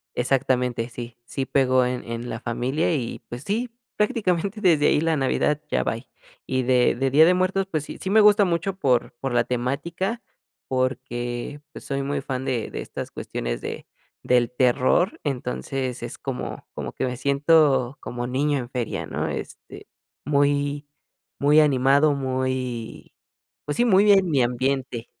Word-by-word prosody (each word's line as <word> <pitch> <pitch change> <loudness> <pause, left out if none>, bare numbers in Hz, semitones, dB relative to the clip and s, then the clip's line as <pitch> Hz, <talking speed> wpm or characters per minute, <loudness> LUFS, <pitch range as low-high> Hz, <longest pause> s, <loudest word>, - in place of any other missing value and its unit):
Exactamente, 125 -2 0
sí 120 0 -8
sí 135 +2 -3
pegó 130 -2 +3
en 125 0 -2
en 115 +1 -5
la 110 - -4
familia 130 +8 -1
y, 120 -5 -3
pues, 120 +2 -7
sí, 230 +5 -1 0.3
prácticamente 210 -2 0
desde 160 -5 +4
ahí 150 - +3
la 165 -1 +2
Navidad 145 +2 +1
ya - - +1
bye. 115 +3 -3 0.4
Y 130 -1 0
de 125 -1 +3
de 135 +1 0
Día 155 +4 +7
de 180 - +5
Muertos, 185 +1 +1
pues 155 -4 -1
sí - - -8
sí 190 - -3
me 215 +1 +6
gusta 210 -1 +6
mucho 180 +2 -1
por 125 -9 +1
por 135 -2 -3
la - - +3
temática, 165 - -2 0.5
porque 130 +1 -3
pues - - -10
soy 140 0 -2
muy 140 0 -2
fan 130 -1 -4
de 120 -4 -2
de - - -4
estas - - -7
cuestiones - - -4
de - - -6 0.4
del 125 -1 +2
terror, 130 - +2
entonces 130 -1 -3
es 120 - -6
como 130 -2 -5
como - - -5
que - - -2
me 125 -1 -3
siento 140 -1 +3
como 120 0 -5
niño 140 +3 +1
en 120 -2 -5
feria, 125 -4 -3
¿no? - - -3
Este, - - -7 0.4
muy 145 0 +1 0.5
muy 145 +2 +5
animado, 140 +1 +4
muy, 130 -3 -3 0.5
pues 145 - -3
sí, 240 - +3
muy 205 -2 +5
en 195 -2 +5
mi 135 - +3
ambiente. 125 0 -1
135 Hz, 165 wpm, -24 LUFS, 125-155 Hz, 0.5 s, Día